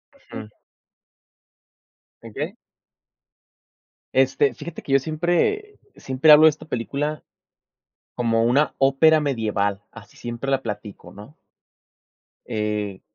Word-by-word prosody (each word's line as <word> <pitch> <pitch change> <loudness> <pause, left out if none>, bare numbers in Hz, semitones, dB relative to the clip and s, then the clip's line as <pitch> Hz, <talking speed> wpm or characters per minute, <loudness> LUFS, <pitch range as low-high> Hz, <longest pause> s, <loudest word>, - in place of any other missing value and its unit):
Ujú. 110 - -10 1.7
¿En - - -11
qué? - - -4 1.6
Este, 135 0 +2
fíjate 155 +6 -8
que 135 - -3
yo 135 - +6
siempre 175 - -1 0.2
siempre 135 +4 +2
hablo 150 +1 +9
de - - +9
esta 155 +1 -7
película 145 +3 -3 0.9
como 115 -1 +1
una 135 +6 +2
ópera 140 +4 +4
medieval, 105 -8 -1
así 105 -3 -15
siempre 120 +3 -5
la 135 - +1
platico, 105 -4 -7
¿no? 105 - -13 1.1
Eh, 105 -2 -3
135 Hz, 105 wpm, -23 LUFS, 110-150 Hz, 1.7 s, hablo